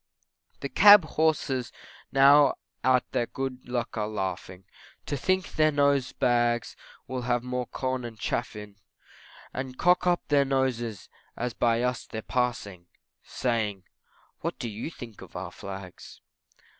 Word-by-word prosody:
The -, -, -3 dB
Cab 205 Hz, -4 st, +8 dB
horses 150 Hz, -6 st, 0 dB, 0.4 s
now 140 Hz, +1 st, +6 dB, 0.3 s
at 130 Hz, 0 st, +4 dB
their 120 Hz, -, 0 dB
good 130 Hz, -2 st, -5 dB
luck 120 Hz, -2 st, -3 dB
are 105 Hz, -, -1 dB
laughing, 95 Hz, -3 st, -5 dB, 0.4 s
To -, -, -2 dB
think 185 Hz, +6 st, 0 dB
their 155 Hz, 0 st, +3 dB
nose 140 Hz, -2 st, +2 dB
bags 120 Hz, -1 st, +1 dB, 0.3 s
will 130 Hz, -1 st, -4 dB
have 120 Hz, 0 st, 0 dB
more 125 Hz, -1 st, -3 dB
corn 130 Hz, -1 st, -3 dB
and 115 Hz, -2 st, -7 dB
chaff -, -, -2 dB
in, 105 Hz, -1 st, -10 dB, 0.8 s
And 130 Hz, -1 st, -5 dB
cock 180 Hz, 0 st, +3 dB
up 175 Hz, -1 st, +1 dB
their 145 Hz, -1 st, +4 dB
noses 125 Hz, -6 st, -1 dB, 0.3 s
as 125 Hz, -1 st, -2 dB
by 115 Hz, 0 st, +1 dB
us 125 Hz, 0 st, -2 dB
they're 110 Hz, 0 st, -6 dB
passing, 105 Hz, -8 st, -2 dB, 0.3 s
Saying, 110 Hz, -6 st, -2 dB, 0.6 s
what -, -, -4 dB
do 120 Hz, -, -4 dB
you 110 Hz, +8 st, -5 dB
think 120 Hz, -9 st, -11 dB
of -, -, -13 dB
our -, -, -5 dB
Flags? 95 Hz, -2 st, -10 dB
125 Hz, 145 wpm, -27 LUFS, 115-135 Hz, 0.8 s, Cab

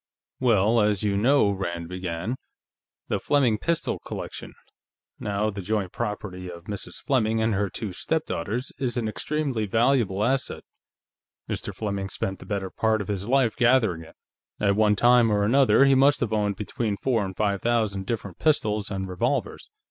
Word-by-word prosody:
"Well, 115 Hz, -2 st, +3 dB
as 105 Hz, -1 st, +1 dB
you 100 Hz, -1 st, +1 dB
know," 120 Hz, +1 st, +4 dB
Rand 85 Hz, -4 st, -4 dB
began, 90 Hz, +4 st, -4 dB, 0.7 s
"the -, -, -1 dB
Fleming 125 Hz, -7 st, +2 dB
pistol 170 Hz, +5 st, -1 dB
collection, -, -, -7 dB, 0.6 s
now 105 Hz, +1 st, -1 dB
the 100 Hz, -1 st, -6 dB
joint 100 Hz, -1 st, -1 dB
property 105 Hz, -5 st, -4 dB
of 85 Hz, -1 st, -9 dB
Mrs. 100 Hz, +1 st, -6 dB
Fleming 115 Hz, -5 st, +1 dB
and 110 Hz, 0 st, +1 dB
her 100 Hz, 0 st, 0 dB
two 105 Hz, -3 st, -5 dB
stepdaughters, 125 Hz, -, -2 dB
is 125 Hz, -2 st, -1 dB
an 115 Hz, -2 st, 0 dB
extremely 135 Hz, -1 st, -2 dB
valuable 115 Hz, -3 st, +2 dB
asset. 130 Hz, +3 st, -1 dB, 0.8 s
Mr. -, -, -4 dB
Fleming 100 Hz, -2 st, -3 dB
spent 95 Hz, 0 st, -3 dB
the -, -, -12 dB
better 100 Hz, -2 st, -3 dB
part 110 Hz, -1 st, +1 dB
of 100 Hz, -, -5 dB
his 100 Hz, 0 st, -3 dB
life 130 Hz, -3 st, +2 dB
gathering 120 Hz, -9 st, +3 dB
it. 80 Hz, -, -14 dB, 0.4 s
At 100 Hz, -1 st, +2 dB
one 105 Hz, 0 st, +4 dB
time 120 Hz, 0 st, +5 dB
or 105 Hz, -1 st, +2 dB
another, 130 Hz, +2 st, +5 dB
he 135 Hz, -, +5 dB
must 140 Hz, +2 st, +4 dB
have 115 Hz, -3 st, -1 dB
owned 105 Hz, -2 st, +1 dB
between 105 Hz, +1 st, -3 dB
four 120 Hz, -3 st, +1 dB
and 95 Hz, -1 st, -6 dB
five 100 Hz, -2 st, 0 dB
thousand 110 Hz, -5 st, 0 dB
different 100 Hz, -6 st, -4 dB
pistols 105 Hz, -9 st, +1 dB
and 95 Hz, -1 st, -3 dB
revolvers. 90 Hz, -1 st, -2 dB
105 Hz, 165 wpm, -25 LUFS, 100-120 Hz, 0.8 s, time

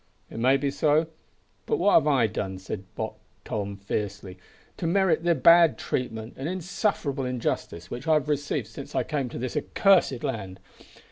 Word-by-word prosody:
"It -, -, -6 dB
may 130 Hz, +3 st, +4 dB
be 140 Hz, 0 st, -1 dB
so. 150 Hz, +2 st, +2 dB, 0.6 s
But 445 Hz, -, +1 dB
what 205 Hz, -, +3 dB
have -, -, +5 dB
I 135 Hz, -6 st, +4 dB
done," 100 Hz, -3 st, -3 dB
said 95 Hz, +1 st, -6 dB
Buck -, -, -4 dB, 0.3 s
Tom 100 Hz, -1 st, -4 dB
fiercely, 100 Hz, -1 st, -4 dB, 0.4 s
"to 170 Hz, -, -2 dB
merit 175 Hz, -2 st, +2 dB
the 170 Hz, -1 st, +3 dB
bad 165 Hz, -2 st, +6 dB
treatment 115 Hz, -2 st, -3 dB
and 135 Hz, +4 st, -3 dB
insufferable 180 Hz, -6 st, -1 dB
injustice 115 Hz, -8 st, -3 dB
which 125 Hz, +6 st, -6 dB
I 160 Hz, -, +5 dB
have 150 Hz, -3 st, 0 dB
received 145 Hz, -1 st, -1 dB
since -, -, -10 dB
I -, -, +2 dB
came 140 Hz, -4 st, -2 dB
to -, -, -7 dB
this 125 Hz, 0 st, -4 dB
accursed 185 Hz, -10 st, +3 dB
land? 95 Hz, -4 st, -4 dB
135 Hz, 175 wpm, -26 LUFS, 110-160 Hz, 0.6 s, bad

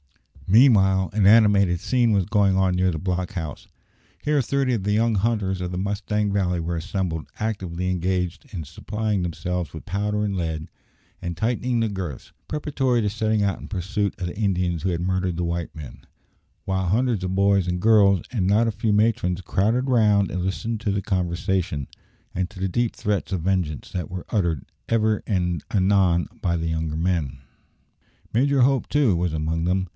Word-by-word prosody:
Meanwhile 95 Hz, -, +5 dB
an 100 Hz, -2 st, +3 dB
animated 100 Hz, -5 st, +5 dB
scene 120 Hz, +3 st, +2 dB
was 100 Hz, -3 st, +2 dB
going 100 Hz, -1 st, +2 dB
on 95 Hz, -1 st, +2 dB
near 90 Hz, 0 st, +2 dB
the 80 Hz, -, -3 dB
block 90 Hz, +1 st, -2 dB
house. 80 Hz, -5 st, -6 dB, 0.5 s
Here 150 Hz, -1 st, +2 dB
thirty 135 Hz, +1 st, 0 dB
of 110 Hz, -5 st, -1 dB
the 105 Hz, -, 0 dB
young 115 Hz, +1 st, +2 dB
hunters 100 Hz, -3 st, 0 dB
of 90 Hz, -1 st, -3 dB
the 90 Hz, -, -3 dB
Mustang 105 Hz, +1 st, -1 dB
Valley 90 Hz, -3 st, +1 dB
were 85 Hz, +1 st, -2 dB
assembled, 85 Hz, -1 st, -3 dB
actively 90 Hz, -5 st, -2 dB
engaged 90 Hz, -, -2 dB
in 85 Hz, -7 st, -5 dB
supplying 105 Hz, +6 st, -2 dB
themselves 90 Hz, 0 st, -3 dB
with 80 Hz, -, -9 dB
powder 105 Hz, +3 st, -1 dB
and 100 Hz, -1 st, -2 dB
lead, 80 Hz, -2 st, -3 dB, 0.5 s
and 85 Hz, -2 st, -4 dB
tightening 120 Hz, +1 st, 0 dB
their 115 Hz, -, +1 dB
girths, 95 Hz, -, -6 dB, 0.2 s
preparatory 135 Hz, -5 st, 0 dB
to 105 Hz, -, 0 dB
setting 110 Hz, 0 st, 0 dB
out 100 Hz, -1 st, -1 dB
in -, -, -9 dB
pursuit 100 Hz, +1 st, -1 dB
of 90 Hz, -, -2 dB
the 85 Hz, -, -7 dB
Indians 90 Hz, -5 st, 0 dB
who 95 Hz, -, +1 dB
had 85 Hz, -2 st, -1 dB
murdered 90 Hz, -1 st, -1 dB
the 85 Hz, -, -1 dB
white 85 Hz, 0 st, -3 dB
men; 75 Hz, -4 st, -10 dB, 0.6 s
while 95 Hz, -1 st, -1 dB
hundreds 115 Hz, +1 st, +1 dB
of 95 Hz, 0 st, -2 dB
boys 100 Hz, -1 st, +3 dB
and 90 Hz, 0 st, -1 dB
girls, 100 Hz, -3 st, +5 dB
and 110 Hz, -8 st, 0 dB
not 105 Hz, +5 st, +3 dB
a -, -, +1 dB
few 110 Hz, +1 st, -1 dB
matrons, 105 Hz, -4 st, +2 dB
crowded 110 Hz, +7 st, 0 dB
round 105 Hz, -6 st, +3 dB
and 90 Hz, -1 st, -2 dB
listened 110 Hz, +4 st, -3 dB
to 110 Hz, -3 st, 0 dB
the 100 Hz, 0 st, -1 dB
conversation, 90 Hz, -4 st, -1 dB, 0.5 s
and 90 Hz, 0 st, -1 dB
to -, -, -12 dB
the 95 Hz, -, 0 dB
deep 120 Hz, +5 st, 0 dB
threats 100 Hz, -2 st, -2 dB
of 95 Hz, -3 st, -1 dB
vengeance 90 Hz, -6 st, -1 dB
that 90 Hz, -5 st, -4 dB
were 90 Hz, 0 st, -6 dB
uttered 85 Hz, -, 0 dB, 0.2 s
ever 110 Hz, -2 st, +2 dB
and 90 Hz, -6 st, 0 dB
anon 95 Hz, -3 st, +3 dB
by 85 Hz, -2 st, 0 dB
the 80 Hz, 0 st, -2 dB
younger 80 Hz, -1 st, -2 dB
men. 80 Hz, -6 st, -1 dB, 1.0 s
Major 135 Hz, +3 st, +3 dB
Hope, 135 Hz, +1 st, +2 dB
too, 140 Hz, -10 st, +3 dB
was 85 Hz, 0 st, 0 dB
among 80 Hz, +1 st, -1 dB
them. 95 Hz, +2 st, 0 dB
95 Hz, 185 wpm, -23 LUFS, 90-105 Hz, 1.0 s, Meanwhile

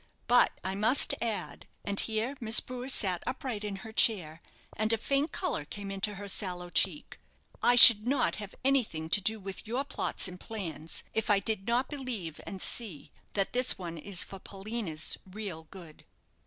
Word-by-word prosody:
But 245 Hz, 0 st, +4 dB
I 190 Hz, -, -3 dB
must 215 Hz, +7 st, +4 dB
add," 230 Hz, -3 st, -5 dB, 0.2 s
and 200 Hz, -1 st, +1 dB
here 225 Hz, +5 st, -1 dB
Miss 225 Hz, 0 st, +6 dB
Brewer 250 Hz, +1 st, -7 dB
sat 185 Hz, -9 st, +1 dB
upright 255 Hz, -4 st, -4 dB
in 205 Hz, -2 st, -4 dB
her 220 Hz, -, -10 dB
chair, 170 Hz, -9 st, +2 dB, 0.3 s
and 215 Hz, +1 st, 0 dB
a 225 Hz, -, +2 dB
faint 275 Hz, +7 st, -1 dB
colour 365 Hz, -, -2 dB
came 200 Hz, +6 st, -8 dB
into 195 Hz, +1 st, -3 dB
her 200 Hz, +1 st, -8 dB
sallow 180 Hz, -3 st, -3 dB
cheek, -, -, 0 dB, 0.4 s
"I 245 Hz, -, +4 dB
should 230 Hz, -2 st, +11 dB
not 265 Hz, -1 st, 0 dB
have 205 Hz, -2 st, -9 dB
anything 215 Hz, -13 st, 0 dB
to 205 Hz, -, +3 dB
do 220 Hz, +3 st, 0 dB
with 195 Hz, +1 st, -8 dB
your 245 Hz, +5 st, -2 dB
plots 280 Hz, -, -2 dB
and 180 Hz, 0 st, -10 dB
plans, 165 Hz, -8 st, -7 dB
if 220 Hz, 0 st, -2 dB
I 205 Hz, -, +4 dB
did 200 Hz, +1 st, -2 dB
not 245 Hz, +3 st, +1 dB
believe, 240 Hz, -, -6 dB
and 195 Hz, -2 st, -5 dB
see, 210 Hz, -11 st, -3 dB, 0.2 s
that 195 Hz, -1 st, -1 dB
this 250 Hz, +1 st, +1 dB
one 175 Hz, -3 st, -7 dB
is 185 Hz, +2 st, -2 dB
for 195 Hz, -, -11 dB
Paulina's 195 Hz, -5 st, -3 dB
real 190 Hz, -4 st, -8 dB
good." 170 Hz, -5 st, -13 dB
210 Hz, 180 wpm, -29 LUFS, 185-235 Hz, 0.4 s, should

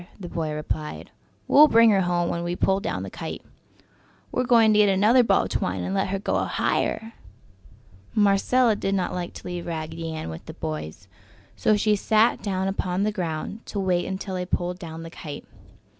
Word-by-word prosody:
the 180 Hz, -, -7 dB
boy 160 Hz, -2 st, -3 dB
replied. 150 Hz, 0 st, -5 dB, 0.4 s
"We'll 300 Hz, +2 st, +8 dB
bring 230 Hz, -4 st, +6 dB
her 195 Hz, -2 st, +3 dB
home 175 Hz, -1 st, 0 dB
when 170 Hz, -, -3 dB
we 175 Hz, +1 st, -2 dB
pull 190 Hz, +2 st, +2 dB
down 200 Hz, -, -3 dB
the -, -, -7 dB
kite! -, -, -6 dB, 0.9 s
We're 250 Hz, -, 0 dB
going 230 Hz, -3 st, +5 dB
to 210 Hz, -, +4 dB
get 205 Hz, -1 st, +5 dB
another 210 Hz, +6 st, +5 dB
ball -, -, +3 dB
of -, -, -5 dB
twine -, -, -2 dB
and 190 Hz, -, -3 dB
let 195 Hz, -1 st, +1 dB
her 195 Hz, +1 st, -1 dB
go 195 Hz, -, -1 dB
higher!" 225 Hz, +1 st, -1 dB, 1.0 s
Marcella 215 Hz, +3 st, +3 dB
did 195 Hz, -1 st, -1 dB
not 185 Hz, -2 st, -1 dB
like 175 Hz, -1 st, -4 dB
to -, -, -10 dB
leave 175 Hz, -1 st, -5 dB
Raggedy 165 Hz, 0 st, -4 dB
Ann 155 Hz, -, -5 dB
with 80 Hz, -, -10 dB
the -, -, -8 dB
boys, 80 Hz, +4 st, -6 dB, 0.5 s
so 215 Hz, -, +2 dB
she 210 Hz, 0 st, +2 dB
sat 220 Hz, +3 st, +2 dB
down 190 Hz, -2 st, -1 dB
upon 190 Hz, -1 st, -1 dB
the 215 Hz, -, +1 dB
ground 180 Hz, +3 st, -4 dB
to 205 Hz, -, -4 dB
wait 180 Hz, -2 st, 0 dB
until 190 Hz, 0 st, -4 dB
they 180 Hz, 0 st, -2 dB
pulled 180 Hz, 0 st, -2 dB
down 165 Hz, -1 st, -8 dB
the 165 Hz, -, -9 dB
kite. 150 Hz, -4 st, -8 dB
190 Hz, 195 wpm, -24 LUFS, 170-210 Hz, 1.0 s, We'll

